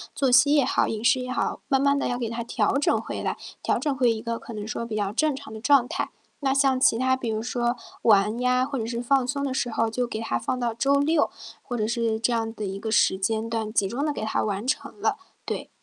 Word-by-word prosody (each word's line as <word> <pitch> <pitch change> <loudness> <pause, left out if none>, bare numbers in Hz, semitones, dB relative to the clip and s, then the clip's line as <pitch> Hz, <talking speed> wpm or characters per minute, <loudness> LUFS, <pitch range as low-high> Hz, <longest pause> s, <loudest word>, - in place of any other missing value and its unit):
作 270 -2 +1
息 265 +4 +6
也 285 - +4
好、 - - +2
饮 220 +1 -3
食 255 - +4
也 250 0 -5
好， - - -2
慢 270 - +3
慢 280 +1 +3
地 - - -1
要 245 - -1
给 240 -2 -2
它 230 +1 -4
调 230 +3 +1
整 290 - +2
回 - - -5
来， - - -2 0.2
调 - - +1
整 290 -3 -1
回 250 -2 +3
一 220 -1 -3
个 230 -1 -3
可 230 - -9
能 210 -1 -5
说 230 +1 -4
比 220 - -4
较 205 -1 -1
正 305 +4 +1
常 265 -5 -10
的 220 - -8
状 275 -1 +4
态。 - - -3 0.3
那 275 -2 0
像 270 -1 +3
其 230 - +4
他 260 +1 +2
比 255 -3 -4
如 220 0 -2
说 240 0 -1 0.2
玩 210 +1 +4
呀， 250 0 +2
或 275 -1 -3
者 225 - -3
是 235 0 -3
放 265 +1 +2
松 280 +2 -1
的 265 - -2
时 245 - -1
候 225 0 0
就 245 +2 -1
给 220 - -4
它 170 - -1
放 185 - -2
到 240 -2 -1
周 275 +5 +2
六， 300 +1 +2 0.3
或 245 - -5
者 215 -1 0
是 230 -1 0
这 235 +2 +1
样 225 -1 -1
的 215 -2 -5
一 195 0 -4
个 220 +2 -4
时 200 -3 +3
间 220 +3 -1
段， 225 -2 -2
集 205 -3 +2
中 245 +8 -3
地 300 - +1
给 285 - -5
它 220 - 0
完 205 +1 -2
成 275 -4 -3
了， 220 - +1 0.3
对。 - - -4
235 Hz, 290 characters per minute, -25 LUFS, 220-265 Hz, 0.3 s, 息